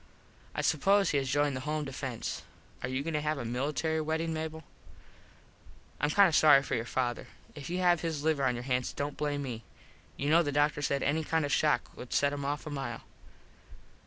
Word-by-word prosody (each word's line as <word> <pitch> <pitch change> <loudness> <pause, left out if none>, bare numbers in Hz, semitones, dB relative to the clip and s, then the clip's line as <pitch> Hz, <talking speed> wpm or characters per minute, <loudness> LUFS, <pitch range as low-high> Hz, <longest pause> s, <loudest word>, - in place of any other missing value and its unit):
I - - 0
suppose 195 -2 +3
he 145 - +2
has 135 -1 -3
joined 145 0 +1
the - - -3
Home 155 -1 -1
defence. 130 -3 -4 0.4
Are 125 - -3
you 130 +2 -2
goin 165 +1 -3
to 150 - 0
have 150 0 -1
a 120 - -4
military 150 +6 -1
weddin, 160 +1 -1
Mable? 160 0 -4 1.4
Im 145 - +2
kind 200 +5 +6
of 165 - 0
sorry 145 -3 +7
for - - -4
your 115 -2 0
father. 120 -1 -2 0.3
If 145 -1 -8
you 180 - -2
have 175 -2 +4
his 160 -4 -3
liver 155 -3 +1
on 125 -1 +2
your 120 - -5
hands 125 -1 -1
dont 145 0 -3
blame 145 -1 -2
me. 115 -4 -5 0.5
You 145 +2 0
know 165 +2 +6
the 145 -4 -1
doctor 145 +1 +2
said 140 -1 0
any 155 +3 +1
kind 160 0 0
of 145 - -3
a - - +4
shock 150 -6 +1
would 125 - -8
set 140 0 +2
him 145 -1 -4
off 145 +1 -3
a 150 - -6
mile. 135 -5 -4
145 Hz, 220 wpm, -30 LUFS, 135-160 Hz, 1.4 s, sorry